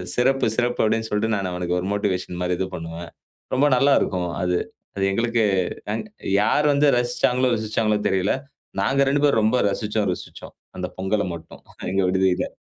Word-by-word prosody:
"சிறப்பு! 130 Hz, +2 st, +2 dB
சிறப்பு!" 120 Hz, 0 st, +1 dB
அப்டின்னு 110 Hz, +1 st, 0 dB
சொல்ட்டு 110 Hz, +2 st, +1 dB
நான் 95 Hz, -2 st, -2 dB
அவனுக்கு 90 Hz, 0 st, -1 dB
ஒரு 90 Hz, -, -4 dB
மோட்டிவேஷன் 90 Hz, -3 st, -2 dB
மாரி 90 Hz, 0 st, 0 dB
இது 95 Hz, -, 0 dB
பண்ணுவேன். 85 Hz, -1 st, -7 dB, 0.4 s
ரொம்ப 140 Hz, +3 st, +4 dB
நல்லா 140 Hz, +3 st, +4 dB
இருக்கும் 90 Hz, -2 st, -1 dB
அது. 90 Hz, 0 st, +1 dB, 0.4 s
அது 100 Hz, -, -1 dB
எங்களுக்கு 115 Hz, +2 st, +1 dB, 0.5 s
அ -, -, 0 dB, 0.5 s
யார் 145 Hz, +8 st, +2 dB
வந்து 145 Hz, +1 st, +3 dB
ரசிச்சாங்களோ, 125 Hz, +1 st, +1 dB
ருசிச்சாங்களோ 110 Hz, -1 st, 0 dB
தெரியல. 95 Hz, +1 st, +1 dB, 0.5 s
நாங்க 135 Hz, +7 st, +2 dB
2 145 Hz, +1 st, +1 dB
பேரும் 140 Hz, -6 st, +4 dB
ரொம்ப 110 Hz, +4 st, +3 dB
ரசிச்சோம், 105 Hz, 0 st, -1 dB
ருசிச்சோம். -, -, -10 dB, 0.2 s
அந்த 90 Hz, 0 st, -3 dB
பொங்கல 100 Hz, +2 st, 0 dB
மட்டும், 80 Hz, 0 st, -12 dB, 0.3 s
எங்க 95 Hz, +1 st, +1 dB
விடுதில. 95 Hz, 0 st, +1 dB
105 Hz, 160 wpm, -23 LUFS, 90-120 Hz, 0.5 s, ரொம்ப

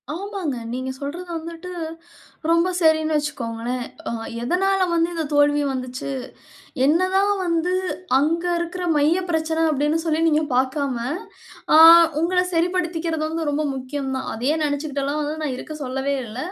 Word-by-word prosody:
ஆமாங்க. 385 Hz, -6 st, -4 dB, 0.2 s
நீங்க 255 Hz, +2 st, -3 dB
சொல்றது 330 Hz, +6 st, -6 dB
வந்துட்டு 335 Hz, +2 st, -8 dB, 0.8 s
ரொம்ப 335 Hz, +2 st, +3 dB
சரின்னு 315 Hz, -2 st, +3 dB
வச்சுக்கோங்களேன். 245 Hz, -4 st, -3 dB, 0.2 s
அ -, -, -3 dB, 0.3 s
எதனால 375 Hz, +6 st, +2 dB
வந்து 335 Hz, 0 st, +2 dB
இந்த 325 Hz, -, -1 dB
தோல்வி 290 Hz, 0 st, +4 dB
வந்துச்சு, 255 Hz, 0 st, -5 dB, 0.8 s
என்னதான் 370 Hz, +6 st, +3 dB
வந்து 335 Hz, +1 st, 0 dB, 0.5 s
அங்க 325 Hz, +5 st, +1 dB
இருக்கிற 345 Hz, +1 st, -4 dB
மைய 300 Hz, +4 st, +3 dB
பிரச்சன 320 Hz, 0 st, 0 dB
அப்டின்னு 295 Hz, +2 st, +1 dB
சொல்லி 320 Hz, -1 st, +1 dB
நீங்க 310 Hz, 0 st, +3 dB
பார்க்காம, 265 Hz, +1 st, 0 dB, 0.8 s
அ -, -, +8 dB, 0.4 s
உங்கள 360 Hz, +2 st, +2 dB
சரிப்படுத்திக்கிறது 335 Hz, -2 st, 0 dB
வந்து 320 Hz, -1 st, -2 dB
ரொம்ப 295 Hz, +1 st, -1 dB
முக்கியம் 265 Hz, +1 st, -4 dB
தான். 260 Hz, -, -4 dB
அதையே 255 Hz, +7 st, 0 dB
நினைச்சுக்கிட்டேல்லாம் 285 Hz, 0 st, -2 dB
வந்து 295 Hz, +1 st, -3 dB
நான் 285 Hz, -4 st, -2 dB
இருக்க 310 Hz, +4 st, -7 dB
சொல்லவே 270 Hz, +2 st, -1 dB
இல்ல. 220 Hz, +2 st, -9 dB
310 Hz, 135 wpm, -22 LUFS, 280-335 Hz, 0.8 s, அ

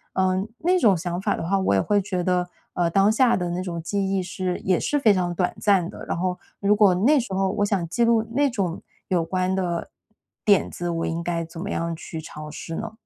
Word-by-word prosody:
嗯， 190 Hz, +2 st, +1 dB
那 360 Hz, +5 st, +2 dB
种 210 Hz, -, +4 dB
想 175 Hz, +2 st, -3 dB
法 205 Hz, +1 st, 0 dB
的 165 Hz, -, -4 dB
话， 195 Hz, +2 st, +2 dB
我 190 Hz, -, +1 dB
也 100 Hz, -, +4 dB
会 205 Hz, -1 st, +2 dB
觉 185 Hz, -2 st, -2 dB
得， 180 Hz, -1 st, +1 dB, 0.2 s
嗯， 170 Hz, -1 st, 0 dB
当 195 Hz, +3 st, +4 dB
下 235 Hz, +2 st, +4 dB
的 175 Hz, -1 st, -2 dB
那 180 Hz, +1 st, -2 dB
种 170 Hz, -3 st, -4 dB
记 195 Hz, +3 st, -1 dB
忆 195 Hz, -, +1 dB
是 185 Hz, 0 st, -3 dB
也 185 Hz, -2 st, +3 dB
是 290 Hz, -, 0 dB
非 220 Hz, -6 st, +5 dB
常 180 Hz, -2 st, 0 dB
短 180 Hz, +1 st, -1 dB
暂 190 Hz, -4 st, +3 dB
的。 -, -, -9 dB
然 -, -, -2 dB
后 180 Hz, 0 st, -1 dB, 0.2 s
如 205 Hz, +1 st, +3 dB
果 205 Hz, -3 st, +5 dB
那 250 Hz, +12 st, +4 dB
时 215 Hz, -5 st, -6 dB
候 190 Hz, 0 st, +1 dB
我 205 Hz, 0 st, 0 dB
想 195 Hz, -5 st, -1 dB
记 235 Hz, +8 st, 0 dB
录 230 Hz, -1 st, +4 dB
那 285 Hz, +2 st, +3 dB
种 185 Hz, -7 st, -2 dB, 0.3 s
有 175 Hz, -3 st, +1 dB
关 185 Hz, +2 st, -1 dB
的 175 Hz, -3 st, -2 dB, 0.5 s
点 200 Hz, -3 st, +4 dB
子， 175 Hz, 0 st, -4 dB
我 165 Hz, -1 st, -1 dB
应 165 Hz, +1 st, -3 dB
该 170 Hz, -1 st, -2 dB
怎 165 Hz, 0 st, -10 dB
么 200 Hz, -, -4 dB
样 165 Hz, -3 st, -2 dB
去 160 Hz, 0 st, -7 dB
尝 150 Hz, -1 st, -8 dB
试 165 Hz, +2 st, -6 dB
呢？ -, -, -4 dB
185 Hz, 255 characters per minute, -24 LUFS, 175-205 Hz, 0.5 s, 非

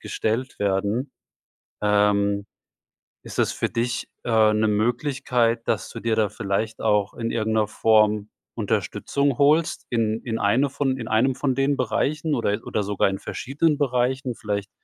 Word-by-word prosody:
gestellt 120 Hz, +4 st, -2 dB
werden. 100 Hz, +7 st, -1 dB, 0.7 s
Ähm, 100 Hz, -1 st, +2 dB, 0.8 s
ist -, -, -9 dB
das -, -, +1 dB
für -, -, -1 dB
dich, 120 Hz, +1 st, -2 dB, 0.2 s
äh, 110 Hz, -2 st, +4 dB
'ne 110 Hz, 0 st, +2 dB
Möglichkeit, 120 Hz, +1 st, 0 dB
dass 110 Hz, -, -1 dB
du -, -, -7 dB
dir 115 Hz, -1 st, 0 dB
da 110 Hz, -2 st, +2 dB
vielleicht 110 Hz, +2 st, -3 dB
auch 105 Hz, -2 st, +1 dB
in 115 Hz, -1 st, -3 dB
irgend 110 Hz, -1 st, -1 dB
'ner 110 Hz, -1 st, +2 dB
Form 105 Hz, -1 st, +2 dB, 0.3 s
Unterstützung 140 Hz, -2 st, -1 dB
holst 155 Hz, +4 st, +2 dB
in 115 Hz, -2 st, 0 dB
in 115 Hz, -2 st, -3 dB
eine 120 Hz, +8 st, +2 dB
von 135 Hz, -1 st, -1 dB
in 115 Hz, -3 st, -6 dB
einem 120 Hz, +5 st, +2 dB
von 130 Hz, 0 st, 0 dB
den 135 Hz, +2 st, +1 dB
Bereichen 150 Hz, +5 st, 0 dB
oder 115 Hz, -4 st, 0 dB
oder 105 Hz, -, -1 dB
sogar 100 Hz, 0 st, +1 dB
in 95 Hz, 0 st, -3 dB
verschiedenen 145 Hz, +3 st, -1 dB
Bereichen, 130 Hz, -1 st, 0 dB
vielleicht 100 Hz, -1 st, -3 dB
115 Hz, 155 wpm, -24 LUFS, 105-130 Hz, 0.8 s, äh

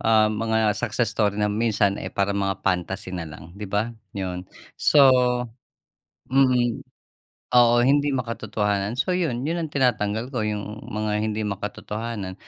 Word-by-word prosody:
ah, 110 Hz, -1 st, +4 dB
mga 110 Hz, -1 st, +1 dB
success 115 Hz, -1 st, -1 dB
story 105 Hz, -3 st, +1 dB
na 105 Hz, 0 st, +1 dB
minsan 105 Hz, -3 st, +1 dB
eh -, -, -4 dB
parang 100 Hz, 0 st, -1 dB
mga 95 Hz, 0 st, -2 dB
fantasy 95 Hz, 0 st, -1 dB
na 90 Hz, -, -3 dB
lang 80 Hz, +3 st, -12 dB
di 105 Hz, 0 st, -7 dB
ba? 110 Hz, +3 st, 0 dB, 0.3 s
Yun 90 Hz, -1 st, -3 dB, 0.3 s
so 150 Hz, -, +3 dB, 1.3 s
mm, 130 Hz, -3 st, +2 dB, 0.7 s
oo 120 Hz, -1 st, +6 dB
hindi 145 Hz, +3 st, +3 dB
makatotohanan. 110 Hz, -3 st, -2 dB
So 180 Hz, +6 st, +1 dB
yun, 135 Hz, -7 st, -1 dB
yun 170 Hz, +1 st, -1 dB
ang 155 Hz, -, -4 dB
tinatanggal 120 Hz, -3 st, +1 dB
ko 110 Hz, -, 0 dB
yung 105 Hz, 0 st, -4 dB
mga 105 Hz, 0 st, -1 dB
hindi 110 Hz, 0 st, -2 dB
makatotohanan 105 Hz, 0 st, -5 dB
110 Hz, 145 wpm, -24 LUFS, 100-120 Hz, 1.3 s, oo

